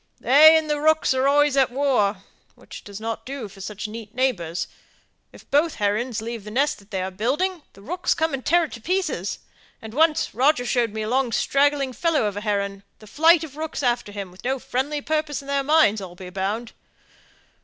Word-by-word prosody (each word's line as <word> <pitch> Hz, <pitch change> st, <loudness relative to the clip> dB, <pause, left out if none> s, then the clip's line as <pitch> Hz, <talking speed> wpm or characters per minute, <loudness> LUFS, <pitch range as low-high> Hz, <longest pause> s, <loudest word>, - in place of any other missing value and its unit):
"They 310 Hz, +4 st, +7 dB
and 315 Hz, -1 st, -1 dB
the 295 Hz, -1 st, -1 dB
rooks 315 Hz, -2 st, +3 dB
are 260 Hz, +1 st, +1 dB
always 290 Hz, 0 st, +3 dB
at 265 Hz, -3 st, +3 dB
war, 240 Hz, -8 st, +1 dB, 0.3 s
which -, -, -12 dB
doesn't 215 Hz, +3 st, -6 dB
do 265 Hz, -4 st, -6 dB
for 195 Hz, 0 st, -14 dB
such 210 Hz, +1 st, -5 dB
near 220 Hz, 0 st, -8 dB
neighbours. 185 Hz, -10 st, -1 dB, 0.6 s
If -, -, -16 dB
both 300 Hz, +3 st, +2 dB
herons 215 Hz, +2 st, -1 dB
leave 230 Hz, -2 st, -5 dB
the 210 Hz, -, -8 dB
nest 230 Hz, -4 st, -1 dB
they 190 Hz, -4 st, -2 dB
are 190 Hz, -, -4 dB
building, 295 Hz, -, -1 dB
the 195 Hz, -, -16 dB
rooks 360 Hz, -, -1 dB
come 320 Hz, -2 st, 0 dB
and 265 Hz, -1 st, -3 dB
tear 345 Hz, +2 st, +3 dB
it 315 Hz, -, -5 dB
to 235 Hz, -, -9 dB
pieces; 325 Hz, -, -2 dB, 0.4 s
and 220 Hz, -1 st, -10 dB
once 310 Hz, +2 st, +2 dB
Roger 255 Hz, +3 st, +2 dB
showed 240 Hz, -3 st, +1 dB
me 220 Hz, 0 st, -4 dB
a -, -, -4 dB
long 250 Hz, +1 st, +1 dB
straggling 275 Hz, +2 st, +1 dB
fellow 330 Hz, -4 st, +1 dB
of 205 Hz, -1 st, -2 dB
a 205 Hz, -, -4 dB
heron, 200 Hz, -2 st, -2 dB
with 215 Hz, -1 st, -16 dB
a -, -, -20 dB
flight 325 Hz, +2 st, +5 dB
of 295 Hz, -3 st, -9 dB
rooks 315 Hz, -2 st, -4 dB
after 240 Hz, -4 st, 0 dB
him, 200 Hz, -3 st, -6 dB
with 185 Hz, -, -16 dB
no 265 Hz, +2 st, 0 dB
friendly 275 Hz, +4 st, -2 dB
purpose 305 Hz, -2 st, -2 dB
in -, -, -14 dB
their 280 Hz, 0 st, +1 dB
minds, 275 Hz, -8 st, +3 dB
I'll 180 Hz, -2 st, -9 dB
be 180 Hz, 0 st, -10 dB
bound. 200 Hz, +5 st, -3 dB
255 Hz, 210 wpm, -23 LUFS, 210-295 Hz, 0.6 s, They